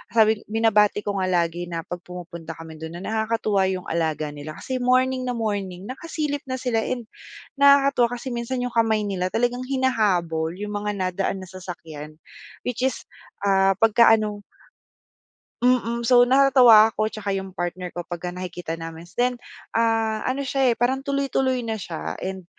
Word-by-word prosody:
sabi 220 -1 +5
binabati 210 -2 +3
ko 200 -1 -2
nga 185 - 0
lagi 175 -1 0
na 165 -1 -4
pag 175 +2 -6
pumupunta 170 -2 -8
kami 160 -1 -11
do'n 160 +1 -7
na - - -9
nakakatuwa 220 -3 0
'yong 185 -1 -2
alaga 155 -2 -1
nila, 150 +1 -8
kasi 260 -1 -4
morning 255 +1 +2
na 245 - -1
morning 200 -5 -3
nakasilip 295 +1 -3
na 260 - -2
sila. 250 -3 -1
And 245 -2 -3 0.6
nakakatuwa 275 -4 +5
kasi 255 +1 -6
minsan 240 +1 -3
'yong 250 - -3
kamay 220 -2 +2
nila 185 -3 -1
talagang 245 +2 0
hinahabol 185 -11 0
'yong 210 +1 -5
mga 210 0 -2
nadaan 190 +1 -2
na 185 - -11
sasakyan, 160 -5 -9 0.5
which 250 -1 -3
is, 265 - 0 0.4
ah, 195 -1 +3
pagka 225 +1 +5
ano 210 -1 -3 1.2
Mm, 235 -1 +2
so 245 0 +6
natatawa 250 -4 +7
ako 215 0 0
'tsaka 205 -2 -4
'yong 190 0 -3
partner 180 0 -4
ko 175 -1 -6
pagka 175 0 -5
nakikita 175 -2 -5
namin. 165 +1 -8
Then, 245 0 +1 0.3
ah, 225 -1 +1
ano 270 +2 -2
siya, 265 -1 +2
eh, 235 - +2
parang 260 +3 +1
tuloy-tuloy 270 -3 0
na 220 -3 -3
siya 80 - -5
and 190 -2 -5
215 Hz, 165 wpm, -23 LUFS, 180-245 Hz, 1.2 s, natatawa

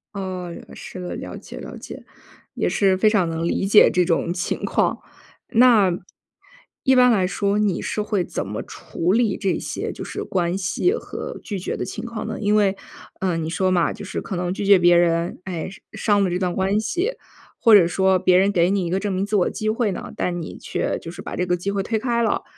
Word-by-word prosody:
哦， 185 -3 -4 0.2
是 185 - -9
的， 180 - -5
了 - - -7
解 - - -10
了 - - -8
解， - - -9 0.5
也 - - 0
是 195 -2 +2
非 215 +3 +4
常 195 -6 +2
能 165 +1 -2
理 190 - 0
解 205 +2 +7
这 180 -1 +2
种 170 0 0
情 180 -1 -3
况。 - - +1 0.5
那 225 -5 +5 0.9
一 265 -1 +4
般 250 -1 +6
来 190 -5 +2
说， 200 +2 0
你 210 -3 +1
是 215 - -2
会 210 -3 0
怎 100 - -4
么 105 +2 -4
处 170 +1 -3
理 225 -2 +2
这 195 -3 -1
些， - - -4
就 - - -7
是 - - -5
关 175 -1 -1
系 195 - +1
和 - - -6
拒 205 -4 -4
绝 180 - -3
的 - - -3
情 220 - -6
况 225 -2 -5
呢？ 220 - -4
因 210 0 +2
为， 200 -2 +2 0.4
呃， 185 -3 0
你 160 -1 -3
说 185 +3 0
嘛， 175 -2 +2
就 - - -8
是 - - -4
可 190 - -5
能 180 0 -1
拒 200 - -4
绝 200 -1 +7
别 175 0 +5
人， 170 0 +1
哎， 175 -3 -4
伤 190 - -13 0.4
伤 - - +3
了 190 - +1
这 180 +1 -1
段 180 -2 -1
关 195 +2 +1
系， 355 - -1 0.5
或 225 -3 +7
者 190 -4 +7
说 190 +2 +2
别 185 0 +4
人 195 +2 +3
给 175 -1 +3
你 195 -2 0
一 - - -3
个 185 +2 0
证 205 - -2
明 190 +1 0
自 210 +1 -2
我 185 - +3
机 215 -1 -3
会 220 -1 0
呢， - - -6
但 175 -1 -2
你 160 - -7
却 - - -2
就 165 - -8
是 175 - -9
把 - - -6
这 180 - -1
个 180 0 0
机 195 +3 -3
会 200 -1 -1
推 220 +2 -1
开 235 0 0
了， 220 - 0
190 Hz, 250 characters per minute, -22 LUFS, 175-210 Hz, 0.9 s, 解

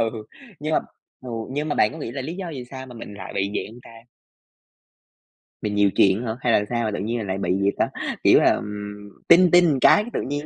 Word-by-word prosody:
Ừ, 115 - +1 0.5
nhưng 155 +1 -3
mà, - - +4 0.4
ừ, 130 - -10 0.2
nhưng 145 +3 -3
mà 145 - -1
bạn 105 - +2
có - - -9
nghĩ - - -5
là 135 0 -4
lý 155 +6 -5
do 190 -1 -5
vì 130 -5 -7
sao 130 -1 -8
mà 125 - -12
mình 115 -3 -9
lại 100 - -8
bị 100 +1 -1
vậy - - -2
hông 120 +2 -14
ta? 115 - -15 1.7
Mình 105 -1 -2
nhiều 105 -1 +4
chuyện 100 +4 +3
hả, 110 0 -3
hay 120 - +2
là 105 - +3
sao 120 -1 -1
mà 110 - -1
tự 105 - -4
nhiên 110 +1 -3
lại 95 0 -2
bị 95 - -3
gì 100 - +3
ta, - - +2 0.4
kiểu - - +6
là, - - +4
ừm, 105 0 -7 0.2
"ting 175 +1 +6
ting" 175 -6 +5
cái 210 - +6
tự - - -1
nhiên 145 +2 -4
115 Hz, 245 wpm, -23 LUFS, 105-145 Hz, 1.7 s, kiểu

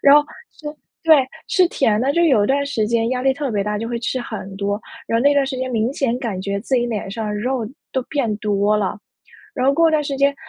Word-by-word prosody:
然 280 0 +8
后 295 - +6 0.4
就 300 -1 -7 0.3
对， 320 -1 +7 0.3
吃 365 -2 +4
甜 220 -10 +1
的， 265 +3 +1
就 340 - +3
有 260 -11 +4
一 - - +1
段 280 +3 +1
时 235 -7 -1
间 230 0 +1
压 255 -1 -1
力 265 +1 +3
特 280 -1 -3
别 205 -3 0
大， 210 +1 -2
就 225 - -4
会 235 0 -2
吃 245 +2 -2
很 195 -5 -7
多。 200 +1 -2 0.3
然 230 - +1
后 - - 0
那 285 +1 +4
段 280 -1 +3
时 270 - -3
间 255 0 -3
明 230 +1 0
显 250 -3 -1
感 220 -8 -3
觉 200 +1 -2
自 250 +5 -2
己 240 -1 +2
脸 215 -4 -4
上 215 0 -3
肉 245 +2 -1 0.3
都 260 - +1
变 245 -7 -1
多 210 -1 +1
了。 210 -1 -1 0.6
然 255 -2 0
后 275 - +5
过 330 +2 +4
段 305 -1 +1
时 280 - -2
间， 280 0 +3
240 Hz, 275 characters per minute, -20 LUFS, 210-280 Hz, 0.6 s, 然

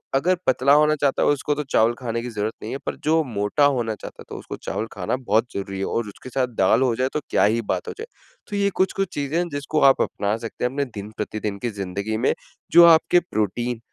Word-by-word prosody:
अगर 180 +7 +3
पतला 130 +2 +4
होना 150 0 +4
चाहता 140 -2 0
है - - +3
उसको 145 0 +1
तो 150 - -2
चावल 115 +2 +4
खाने 115 -2 -3
की 125 - -4
ज़रूरत 110 -1 -3
नहीं 110 - -5
है - - -2
पर - - -2
जो 160 +1 +3
मोटा 110 +4 +1
होना 115 -3 -1
चाहता - - -10
है - - -12
तो - - -7
उसको - - -7
चावल 110 - -4
खाना 90 +2 -2
बहुत 120 -3 +1
ज़रूरी 100 0 -4
है। 95 - -1
और 115 -2 -2
उसके 105 - -11
साथ 130 0 0
दाल 105 +6 +4
हो 125 -3 +1
जाए 130 - +1
तो - - 0
क्या - - +3
ही 110 +3 +3
बात 105 - -3
हो - - -4
जाए, 450 - -6 0.4
तो 205 - -5
ये 200 0 +2
कुछ-कुछ 195 0 0
चीज़ें 145 +1 -2
हैं 175 0 0
जिसको 145 +2 -1
आप 135 - +3
अपना 100 +1 -2
सकते 115 0 -7
हैं 125 - 0
अपने 140 +1 -1
दिन 105 -4 -8
प्रतिदिन 105 -1 -3
की 120 - 0
ज़िंदगी 100 +4 -3
में - - +3 0.4
जो 170 +1 +9
आपके 170 +1 +6
प्रोटीन 115 +3 -1
125 Hz, 245 wpm, -23 LUFS, 110-145 Hz, 0.4 s, जो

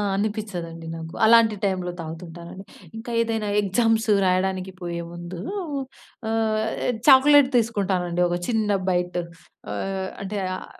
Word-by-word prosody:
అనిపిచదండి 195 -6 -4
నాకు. 165 0 -8
అలాంటి 225 -1 +6
టైమ్‌లో 185 -2 -1
తాగుతుంటానండి. 170 +3 -8 0.3
ఇంకా 230 +2 -7
ఏదైనా 225 -2 -1
ఎగ్జామ్స్ 225 +3 +1 0.2
రాయడానికి 185 0 0
పోయేముందు 170 0 -6 0.9
ఆహ్. 220 -1 +1 0.5
చాక్లెట్ 280 0 +7
తీసుకుంటానండి 190 -6 0
ఒక 175 0 -1
చిన్న 220 -3 0 0.2
బైట్. 180 0 0 0.5
ఆహ్, 190 - -3
అంటే 200 +1 -3 0.2
ఆహ్, - - -8
190 Hz, 105 wpm, -24 LUFS, 175-220 Hz, 0.9 s, చాక్లెట్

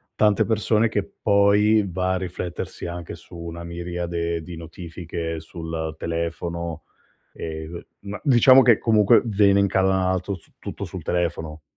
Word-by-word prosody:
tante 105 -2 +3
persone 110 0 +2
che 100 -2 -2
poi 105 +1 +4
va 95 +1 -1
a - - 0
riflettersi 90 -1 -5
anche 85 -1 -6
su 85 +1 -15
una 85 0 -7
miriade 85 -1 -3
di 85 0 -9
notifiche 85 0 -6
sul 80 -1 -5
telefono 85 0 -4 0.5
e 80 -1 -6
co 85 - -6 0.2
ma 100 0 -7
diciamo 130 0 +7
che 120 -4 +5
comunque 105 -3 +4
vene 100 -2 +4
incanalato 95 -1 +1
su 90 - -15
tutto - - -6
sul - - -7
telefono. 80 -3 -2
90 Hz, 140 wpm, -23 LUFS, 85-100 Hz, 0.5 s, diciamo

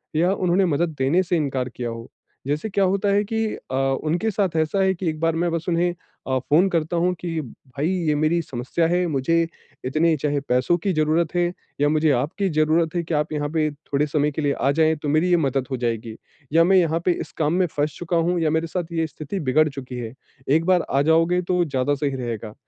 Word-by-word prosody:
या 175 +4 +3
उन्होंने 185 0 +2
मदद 160 0 0
देने 145 +8 +3
से 175 -1 0
इनकार 135 -4 -1
किया 120 0 -5
हो। 115 0 -8 0.4
जैसे 150 +9 -1
क्या 200 0 +1
होता 195 +2 +1
है 205 +1 +3
कि 225 +1 -1 0.3
अ, - - -1
उनके 155 +10 0
साथ 190 -4 -1
ऐसा 160 +5 +1
है 190 0 +3
कि 175 -2 -2
एक 155 - -4
बार 165 0 +1
मैं 170 +1 0
बस 165 0 -2
उन्हें 175 +1 +1 0.3
अ, 130 -1 +1
फ़ोन 155 +8 +3
करता 165 -1 -1
हूँ 180 +2 +2
कि 165 -2 -3
"भई 140 +3 -5 0.2
ये 150 - +2
मेरी 155 +3 +1
समस्या 135 +4 -2
है, 180 +1 +1
मुझे 165 +3 +1 0.4
इतने 155 +5 +2
चाहे 145 -1 0
पैसों 125 +7 +2
की 190 +3 -1
ज़रूरत 155 +2 +1
है 175 - +3 0.4
या 145 - +4
मुझे 155 0 +2
आपकी 155 - 0
ज़रूरत 160 +2 +2
है 170 - 0
कि 165 - -4
आप 150 +1 0
यहाँ 145 -1 -2
पे 155 0 +1
थोड़े 145 0 -2
समय 150 0 +1
के 155 - -4
लिए 145 -1 +1
आ 140 - +1
जाएँ 160 0 +4
तो 145 - -1
मेरी 155 +4 +2
ये 175 - +4
मदद 135 -4 0
हो 130 - -1
जाएगी।" 115 -2 -3 0.4
या 165 +1 +6
"मैं 190 +3 +4
यहाँ 165 -2 +2
पे 180 - +4
इस - - -8
काम 155 0 +1
में 185 +1 +3
फँस 150 -1 -2
चूका 175 0 -1
हूँ 175 +2 +1
या 160 - +2
मेरे 160 +2 0
साथ 175 0 -4
ये 165 -1 0
स्थिति 155 +5 -6
बिगड़ 155 +1 +3
चुकी 130 -3 -7
है, 115 -1 -6 0.4
एक 160 +4 +3
बार 185 -2 +4
आ 135 - +2
जाओगे 165 +4 +3
तो 180 0 +1
ज़्यादा 135 0 0
सही 140 -1 -2
रहेगा।" 115 -4 -5
160 Hz, 235 wpm, -23 LUFS, 140-175 Hz, 0.4 s, या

